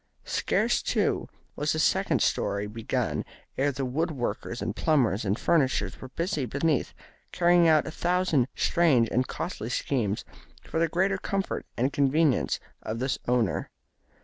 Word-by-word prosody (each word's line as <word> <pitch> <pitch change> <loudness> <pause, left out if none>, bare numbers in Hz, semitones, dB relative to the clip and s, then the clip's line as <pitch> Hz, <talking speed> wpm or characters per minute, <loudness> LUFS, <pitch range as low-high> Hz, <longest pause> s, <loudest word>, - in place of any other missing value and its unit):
Scarce, - - +1
too, - - 0 0.3
was - - 0
the - - -2
second - - +2
storey 100 +1 0
begun 110 +2 -2 0.3
ere 140 +2 +1
the 135 0 -3
wood 155 +7 -1
workers 120 -4 -3
and - - -3
plumbers 125 - +2
and 100 +1 0
furnishers 140 -5 +1
were 130 - -8
busy 155 -2 -2
beneath, 140 +4 0 0.4
carrying 175 -1 +4
out 155 -2 +4
a - - -5
thousand 175 -6 +1
strange 145 -9 +3
and 125 +2 +1
costly 155 - -4
schemes 115 -5 -1 0.4
for 160 - -3
the 165 - +3
greater 190 +4 +1
comfort 195 -1 -3
and 130 +4 +1
convenience 140 0 +2 0.2
of 110 - -4
the 130 +3 0
owner. 120 -7 +1
140 Hz, 150 wpm, -27 LUFS, 120-165 Hz, 0.4 s, carrying